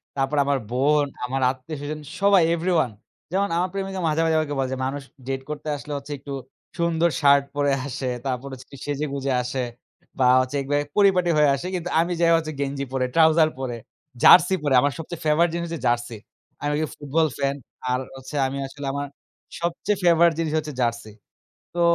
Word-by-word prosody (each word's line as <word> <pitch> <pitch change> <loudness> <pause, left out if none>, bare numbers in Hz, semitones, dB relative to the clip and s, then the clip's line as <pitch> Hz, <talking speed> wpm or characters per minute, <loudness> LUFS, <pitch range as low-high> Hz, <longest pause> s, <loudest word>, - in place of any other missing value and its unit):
তারপর 135 +2 0
আমার 140 0 +2
বোন, 145 +4 +3 0.2
আমার 135 +2 -2
আত্মীয়স্বজন 145 +3 -6 0.2
সবাই 200 -2 +6
এভরিওয়ান। 165 -6 +1 0.4
যেমন 200 +2 +1
আমার 180 +2 +1
প্রেমিকা 195 -1 -3
মাঝে, 155 +1 +1
মাঝে 160 -1 +2
আমাকে 145 -2 -2
বলে 130 -1 0
যে - - -3
মানুষ 140 +2 -3 0.3
ডেট 135 0 -2
করতে 150 0 -6
আসলে 145 +1 -7
হচ্ছে 140 +1 -9
একটু, 140 +1 -7 0.4
সুন্দর 170 0 +2
শার্ট 140 -1 +6
পরে 145 -1 +2 0.2
আসে 130 0 -3 0.2
তারপর 130 0 -2
হচ্ছে 130 0 -10
যে - - -9
সেজে-গুজে 140 -2 -2
আসে। 125 +1 -2 0.6
বা 130 - +5 0.3
চেকবে 140 0 0 0.2
পরিপাটি 190 -4 +4
হয়ে 150 -1 +5
আসে, 140 +6 -5
কিন্তু 175 -1 -3
আমি 170 +2 +1
যাই 170 0 +5
হচ্ছে 160 -1 -3
গেঞ্জি 140 0 -2
পরে, 130 -1 +1
ট্রাউজার 160 -1 +5
পরে, 130 -3 -3 0.5
জার্সি 180 +4 +8
পরে। 145 -2 +1
আমার 145 - +2
সবচেয়ে 165 +1 -7
ফেভারিট 160 +3 +3
জিনিস 170 0 -2
হচ্ছে 165 -2 -5
জার্সি। 120 -1 -1 0.5
আমি 145 0 0
যে - - +1
ফুটবল 150 +2 +1
ফ্যান, 140 0 0 0.4
আর 125 - +1 0.2
হচ্ছে 130 +2 -9
আমি 135 +1 -4
আসলে 145 +1 -9
আমার 145 0 -3 0.5
সবচেয়ে 175 +4 -1
ফেভারিট 170 -1 +5
জিনিস 160 -2 -1
হচ্ছে 155 -1 -3
জার্সি। 115 -2 -1 0.6
তো 175 - 0
145 Hz, 180 wpm, -24 LUFS, 135-165 Hz, 0.6 s, জার্সি